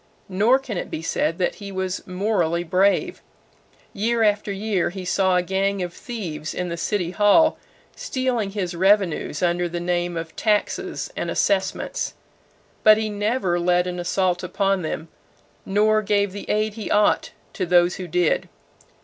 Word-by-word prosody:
Nor 210 +7 +4
can 250 -9 -5
it - - -6
be 160 - -5
said 165 0 0
that 180 - 0
he 200 -1 -6
was 190 0 -3
morally 180 -3 0
brave. 195 - +1 0.7
Year 225 +3 +1
after 210 -1 +1
year 200 -2 -1
he 185 +1 -7
saw 190 0 +2
a 180 - +2
gang 195 +1 0
of 175 -1 -5
thieves 170 -12 -6
in 180 -1 -2
the 170 - -3
City 175 0 -1
Hall 210 - +4 0.4
stealing 255 - -1
his 195 -3 -3
revenues 190 -3 +1
under 175 0 +1
the 175 +1 -4
name 175 0 -1
of 165 0 -6
taxes 210 -2 -1
and - - -3
assessments, 195 -2 -1 0.7
but 215 0 +7
he 220 0 -1
never 205 -3 0
led 180 0 +2
an 180 0 -4
assault 180 0 0
upon 195 +1 0
them 160 0 -4 0.6
nor 215 +2 +3
gave 205 -1 +1
the 200 +1 -8
aid 215 0 +1
he 220 -1 -6
ought 210 0 +3 0.2
to 185 - -2
those 175 0 +4
who 185 - -6
did. 175 0 +1
190 Hz, 160 wpm, -23 LUFS, 175-210 Hz, 0.7 s, but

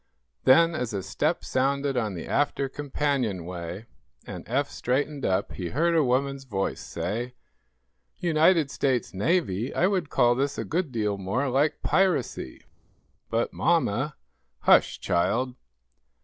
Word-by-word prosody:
Then, 165 +6 +6
as 125 -8 -3
a 95 - -3
step 145 - -1
sounded 140 +1 0
on 110 -6 -1
the 85 - -6
after 140 -1 0
companionway, 110 - -3 0.4
and - - -7
Eph 140 +4 0
straightened 140 +3 -1
up, 95 +1 0
he 90 -3 -5
heard 170 +5 +1
a 160 - +4
woman's 135 +2 0
voice 100 -7 -2
say: 120 +6 -4 0.8
"United 160 -2 +3
States 130 -7 0
Navy? 115 - 0
I 175 - +3
would 185 -6 0
call 120 0 +4
this 135 +3 -1
a - - -3
good 170 -3 -1
deal 105 -4 -1
more 120 +9 -1
like 140 +4 +1
piracy!" 175 - 0 0.7
"But, 115 +1 -1
mamma 150 -4 +1 0.2
" - - -48
"Hush, - - +4
child!" 125 +9 0
130 Hz, 135 wpm, -26 LUFS, 105-150 Hz, 0.8 s, Then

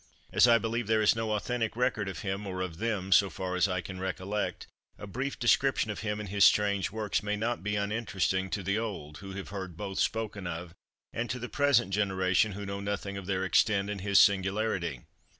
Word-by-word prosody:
As - - +6
I 115 -1 +7
believe 115 0 -2
there 110 -1 +3
is 105 - +5
no 110 -1 -1
authentic 115 +1 -1
record 110 -5 0
of 95 - -6
him, 100 +1 -3
or 95 -1 -4
of 90 -3 -5
them, 105 -4 -2
so 100 +1 +6
far 90 +2 -4
as 90 - +3
I 90 -2 -1
can 95 0 -8
recollect, 95 +3 -3 0.3
a - - -8
brief 130 +7 -4
description 120 -1 +2
of 105 - -6
him 105 -1 -2
and 105 - -5
his 100 0 +2
strange 100 -2 +4
works 110 0 -1
may 105 0 -1
not 115 +3 -2
be 105 +2 -2
uninteresting 100 -2 -1
to 100 - -3
the 100 +4 0
old, 85 -10 -5
who 95 -1 -8
have 95 0 -6
heard 95 -4 -6
both 95 -1 -4
spoken 105 -4 -1
of, 85 0 -6 0.4
and 120 +1 -2
to 125 - -2
the 125 0 -6
present 140 -8 +3
generation 95 0 +2
who 100 +1 -6
know 100 0 -4
nothing 100 0 -3
of 100 -2 -7
their 95 -1 0
extent 100 +2 +2
and 100 -2 -5
his 100 0 +2
singularity. 95 - +2
100 Hz, 215 wpm, -29 LUFS, 95-110 Hz, 0.4 s, I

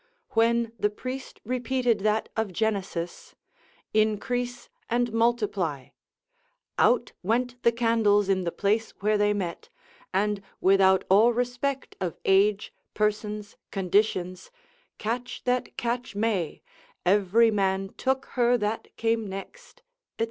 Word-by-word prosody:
When 230 0 +2
the 210 - +2
priest 255 +5 -7
repeated 250 -1 0
that 215 +2 +1
of 220 -3 -1
Genesis, 190 -4 -3 0.6
Increase 245 +3 0 0.2
and 240 -1 0
multiply, 210 - 0 0.9
out - - +3
went 245 +4 -1
the 235 - +4
candles 225 -4 +3
in 190 -1 +1
the 170 - -1
place 215 +4 0
where 215 +1 +2
they 205 0 +3
met, 185 -5 -4 0.4
and 205 +1 0 0.2
without 190 0 +4
all 215 +5 +5
respect 245 +3 -2
of 180 -4 -2
age, 200 +2 +3 0.2
persons, 210 0 -2
conditions, 185 - 0 0.5
catch 240 +3 -4
that 250 0 -1
catch 240 -2 -2
may, 205 -6 -1 0.4
every 205 +4 +4
man 195 -1 0
took 265 0 0
her 245 -1 +3
that 210 0 -2
came 225 -1 0
next, 195 - -9 0.3
&c. - - -49
215 Hz, 120 wpm, -27 LUFS, 195-240 Hz, 0.9 s, all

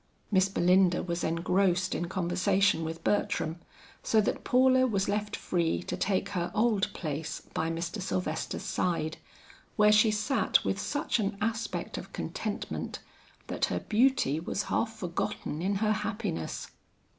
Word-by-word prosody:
Miss 190 -1 +4
Belinda 180 -1 +3
was 170 -1 -2
engrossed 180 +2 +1
in 175 - -2
conversation 185 0 +2
with 160 +1 -5
Bertram, 170 -5 0 0.4
so 220 - +3
that 215 - 0
Paula 260 +1 +4
was 200 -4 0
left 210 +1 -1
free 170 -1 0
to - - -3
take 195 0 0
her 175 -3 -2
old 215 -3 +2
place 155 -1 -4
by 160 - 0
Mr. 170 +5 -3
Sylvester's 180 -4 -2
side, 160 -3 -1 0.6
where 210 -1 +5
she 215 +1 +6
sat 215 +6 +2
with - - 0
such 290 -4 -1
an 200 -1 -1
aspect 225 +1 -2
of - - -11
contentment, - - -4 0.5
that - - 0
her - - -2
beauty 220 - +2
was 185 +4 -2
half - - +1
forgotten 175 -6 -3
in 195 +3 0
her 215 +2 +1
happiness. 210 - -3
190 Hz, 145 wpm, -29 LUFS, 170-215 Hz, 0.6 s, she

